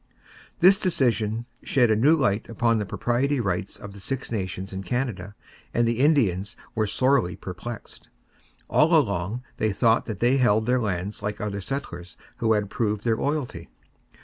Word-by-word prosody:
This 190 +3 +7
decision 120 - +1 0.2
shed 125 -4 +2
a - - +4
new 145 +9 +4
light 110 -7 0
upon 115 0 +1
the 105 - -3
proprietary 130 +7 0
rights 95 -4 -2
of 100 -1 -10
the 100 - -11
Six 130 +6 -4
Nations 95 -2 -4
in 95 - -4
Canada 105 -2 -3 0.4
and 120 0 +3
the 115 0 0
Indians 115 - +2 0.2
were 110 -1 0
sorely 130 -5 +2
perplexed. 100 +6 -8 0.6
All - - +4
along 105 +9 0
they 110 - +1
thought 115 +3 +2
that 110 -4 -5
they 120 +6 +3
held 110 -4 +3
their 125 +1 +2
lands 100 -1 -3
like 105 0 -3
other 100 -1 -3
settlers 90 -9 -6 0.2
who 110 -1 +2
had 105 -2 -1
proved 105 -2 -1
their 115 -2 +2
loyalty. 145 -3 -3
110 Hz, 165 wpm, -25 LUFS, 100-125 Hz, 0.6 s, This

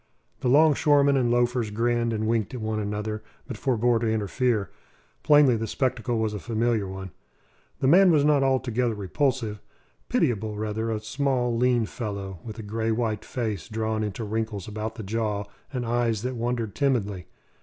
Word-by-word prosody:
The - - -2
'longshoremen 145 0 +5
and 125 -3 +2
loafers 120 -1 +1
grinned 115 +2 0
and 110 -1 -1
winked 115 +1 0
at - - -4
one 110 0 -2
another, 105 +1 -3 0.2
but - - -6
forbore 120 -3 +1
to 110 -1 0
interfere. 110 - 0 0.5
Plainly 145 -4 +6
the 115 +1 -3
spectacle 120 -1 -1
was 110 -1 0
a 105 - -4
familiar 115 -1 0
one. 95 -1 -7 0.7
The 130 - +2
man 185 +6 +7
was 150 -4 +4
not 150 -2 +4
altogether 125 -3 +1
repulsive; 110 +1 -1 0.5
pitiable, 110 -2 0
rather; 110 +1 -2
a 110 -1 -1
small, 125 +1 0
lean 120 -1 +2
fellow, 100 -5 -5
with 110 -1 -8
a 110 - -6
grey 110 +2 -2
white 110 -1 -1
face 110 -8 -4
drawn 110 0 -1
into 105 +2 -4
wrinkles 110 -2 -3
about 110 +1 -4
the 110 - -7
jaw, 105 0 -1 0.3
and 125 -3 -3
eyes 115 -2 0
that 130 +1 -2
wandered 120 -3 -2
timidly. 105 -10 0
115 Hz, 165 wpm, -26 LUFS, 105-125 Hz, 0.7 s, man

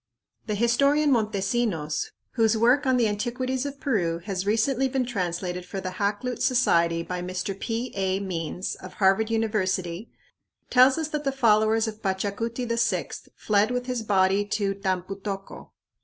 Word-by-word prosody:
The 210 - -1
historian 280 +7 +3
Montesinos, 205 - 0 0.2
whose 225 -2 +2
work 250 +5 +3
on 260 -1 +3
the 235 -2 +3
antiquities 250 +5 -2
of 280 0 -8
Peru 180 -13 0
has 195 -1 -3
recently 245 +5 +2
been 260 -1 -1
translated 180 -5 -3
for 195 +2 -6
the 185 -1 -4
Hakluyt 205 +6 -2
Society 170 -10 +2
by 180 +1 -4
Mr. 185 +2 -3
P. 235 +2 -3
A. 190 -1 0
Means, 180 -1 -3
of 185 - -10
Harvard 195 +3 +2
University, 205 -4 -1 0.6
tells 260 +2 +6
us 320 -1 -2
that 300 -1 -3
the 275 - 0
followers 225 -3 +3
of 215 0 -6
Pachacuti 205 +5 -2
VI 230 0 -1
fled 210 +1 +2
with 250 0 -2
his 250 -2 -2
body 195 -1 +2
to 205 -1 -1
"Tampu 195 0 -3
tocco." 195 -1 -6
215 Hz, 155 wpm, -26 LUFS, 190-245 Hz, 0.6 s, tells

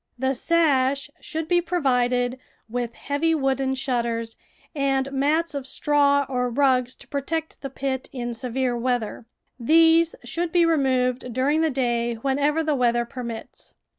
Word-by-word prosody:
The 265 +2 0
sash 280 -2 +1
should 320 0 -5
be 350 0 +3
provided 250 -7 0 0.3
with 235 0 -4
heavy 320 +3 0
wooden 270 -2 0
shutters 235 -3 -2 0.4
and 275 -2 0
mats 300 +5 +1
of 275 -2 -4
straw 285 -1 +2
or 250 -2 -1
rugs 255 -1 +2
to - - -14
protect 315 +3 -4
the 275 - -5
pit 265 0 -3
in 240 -2 -4
severe 250 +1 -2
weather; 240 -2 -2 0.3
these 325 +5 +4
should 335 +8 -3
be 345 0 +4
removed 255 -5 +1
during 275 +6 +1
the 320 - +2
day 240 -3 0
whenever 285 +6 0
the 310 -1 +1
weather 240 -3 +2
permits. 235 -3 -8
265 Hz, 140 wpm, -24 LUFS, 245-295 Hz, 0.4 s, these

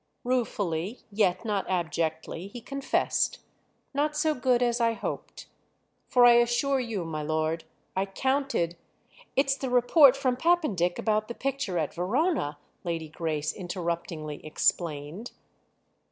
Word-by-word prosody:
Ruefully, 210 -6 -1
yet 200 0 +1
not 205 -3 -1
abjectly, 165 -1 -2
he 220 +5 -8
confessed, 275 +3 0 0.6
"Not 300 +2 0
so 310 +1 +2
good 250 -2 +2
as 240 0 +1
I 230 0 +3
hoped. - - -6 0.6
For 245 -1 +5
I 240 - +9
assure 240 +3 +2
you, 225 -8 -3
my 155 -2 -4
lord, 155 +1 -1 0.3
I 190 +1 0
counted—" 265 -6 0 0.6
"It's 275 0 +3
the 270 -1 -4
report 250 +3 +6
from 255 -2 0
Pappendick 255 - +2
about 215 -1 0
the 235 - -6
picture 270 -9 -2
at 155 -3 -1
Verona," 190 - 0 0.3
Lady 165 -2 -3
Grace 155 -1 -2
interruptingly 170 -4 -4
explained. 155 +5 -1
210 Hz, 125 wpm, -28 LUFS, 165-255 Hz, 0.6 s, I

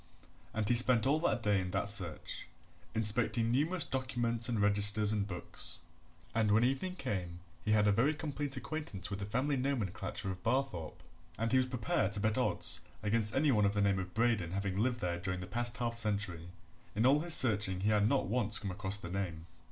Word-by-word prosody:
And 110 -1 -2
he 120 - +3
spent 120 -1 +5
all 145 +4 +2
that 155 -8 -1
day 105 -2 +2
in 90 - -5
that 95 - -2
search, 95 -6 0 0.5
inspecting 115 +1 +3
numerous 155 +7 +1
documents 120 -3 -2
and 115 -3 -1
registers 105 +1 +3
and 105 -2 -1
books, 90 -3 -2 0.5
and 110 -2 +1
when 110 +3 +4
evening 135 +9 -1
came 90 - -4 0.2
he 105 - +1
had 105 -1 +3
a - - +4
very 130 +9 +2
complete 145 -2 -4
acquaintance 125 - -5
with 100 - -4
the 100 - -5
family 135 +6 -1
nomenclature 105 -7 -3
of 95 0 -8
Barthorpe, 115 - -2 0.3
and 115 0 -2
he 130 - +4
was 130 - 0
prepared 110 -6 -1
to 105 - -2
bet 110 +1 0
odds 125 - +2 0.2
against 105 0 +1
any 145 +1 +3
one 105 -4 +2
of 100 +1 +1
the - - +1
name 100 -1 +2
of 90 -1 -7
Braden 110 -7 0
having 100 -1 -2
lived 120 +4 -1
there 85 -1 -2
during 95 0 -3
the 90 - -6
past 120 +4 -3
half 115 -1 -3
century. 100 -6 -1 0.5
In 110 +3 +1
all 140 +3 +5
his 170 +1 +4
searching 100 -6 +5
he 105 - +1
had 105 0 +2
not 140 - +1
once 110 -3 +1
come 100 - -4
across 95 +1 +1
the 85 -4 -7
name. 90 -4 -4
105 Hz, 205 wpm, -33 LUFS, 100-125 Hz, 0.5 s, spent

